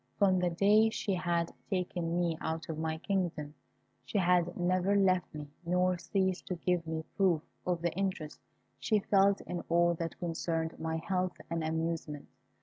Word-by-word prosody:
From 190 -3 +4
the 180 0 +2
day 205 +5 +4
she 205 -2 -2
had 170 -2 0 0.2
taken 175 -3 -1
me 170 -2 +1
out 160 0 -3
of 160 -1 -3
my 160 0 -1
kingdom, 165 -5 -2 0.5
she - - -3
had 175 -2 +2
never 185 +2 +2
left 185 -3 +3
me, 150 -1 -8
nor 180 +1 +1
ceased 190 0 -1
to 180 - -2
give 175 -1 0
me 160 0 -3
proof 180 -6 +3 0.2
of 175 -2 0
the 170 - +1
interest 185 -5 -3 0.4
she 215 - +2
felt 200 -1 +3
in 175 -1 -4
all 170 +1 +4
that 165 0 -4
concerned 165 -1 -2
my 160 0 -2
health 185 +2 -1
and 165 -1 -1
amusement. 160 -2 -3
175 Hz, 165 wpm, -32 LUFS, 165-185 Hz, 0.5 s, From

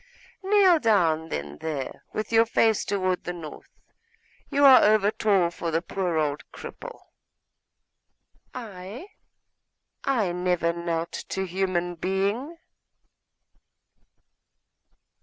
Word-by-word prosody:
Kneel 385 -3 +4
down 165 - +2
then 75 - -5
there, 145 -5 -5
with 215 - -4
your 225 0 +4
face 220 -1 +2
toward 185 -2 -1
the 175 - -4
north; 165 -3 -10 0.8
you 285 0 +3
are 265 -2 +9
over 210 -1 +4
tall 195 -6 +2
for 170 -1 -4
the 165 +1 -1
poor 180 -2 -2
old 150 -2 -1
cripple.' - - -10 1.5
'I? 210 - -8 1.0
I 230 -10 +1
never 180 -1 0
knelt 170 -1 -3 0.2
to 190 - -2
human 180 -1 -1
being. 200 - -2
185 Hz, 100 wpm, -25 LUFS, 170-225 Hz, 1.5 s, are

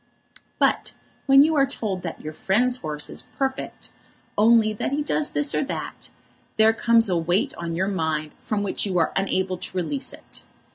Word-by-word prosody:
But - - +1 0.3
when 275 0 +8
you 320 +2 +2
are 275 -2 +4
told 210 -8 -3
that 170 -2 -6
your 155 0 -7
friend's 245 +10 +1
horse 150 -7 -4
is - - -2 0.2
perfect, 270 -1 -3 0.4
only 220 0 +4
that 215 - -3
he 290 +2 0
does 295 0 0
this 290 -1 +1
or - - +1
that, - - -6 0.5
there 220 +1 +5
comes 230 0 +3
a 185 - +1
weight 175 +4 0
on 170 -1 -5
your 190 +3 0
mind 160 -5 -2
from 210 -2 -2
which 200 - -1
you 185 -2 -1
are 165 - +1
unable 190 -1 0
to 185 - -5
release 265 - -2
it. - - -13
205 Hz, 185 wpm, -24 LUFS, 175-250 Hz, 0.5 s, when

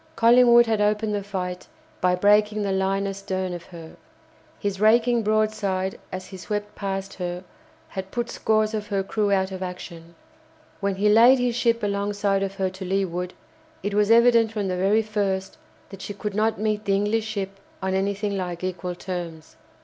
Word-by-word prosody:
Collingwood 240 0 +6
had 220 -2 0
opened 210 +1 +1
the 205 - -1
fight 185 -2 -5 0.3
by 180 0 +3
breaking 210 +2 +3
the 200 - -1
line 195 +1 0
astern 190 -2 -3
of 175 -1 -7
her. 165 -3 -11 0.6
His 200 -1 -3
raking 235 +2 +4
broadside 215 -3 0
as 185 0 -5
he 190 - -10
swept 205 +3 -4
past 195 -1 -4
her 180 0 -5 0.5
had 190 0 -6
put 240 +3 -3
scores 215 0 +1
of 210 -1 -3
her 200 -3 -1
crew 205 +1 -1
out 190 -1 +1
of 190 0 -6
action. 170 -2 -8 0.6
When 200 -1 -1
he 200 +2 +1
laid 230 +5 +7
his 245 -1 0
ship 235 -2 +1
alongside 200 0 0
of 195 0 -3
her 190 -1 -1
to 190 +1 -8
leeward, 180 -1 -2 0.5
it 205 +1 -2
was 210 0 +2
evident 230 -1 +5
from 205 -3 -2
the 180 - -1
very 200 +4 +2
first 200 -3 -2 0.3
that 195 -1 -10
she 205 - -6
could 210 0 -4
not 215 +1 +1
meet 215 0 -1
the 195 - +2
English 210 +2 0
ship 195 -2 -4 0.2
on 190 0 -2
anything 200 +1 -1
like 180 -2 -4
equal 180 -1 -3
terms. 170 -3 -6
200 Hz, 180 wpm, -24 LUFS, 190-215 Hz, 0.6 s, laid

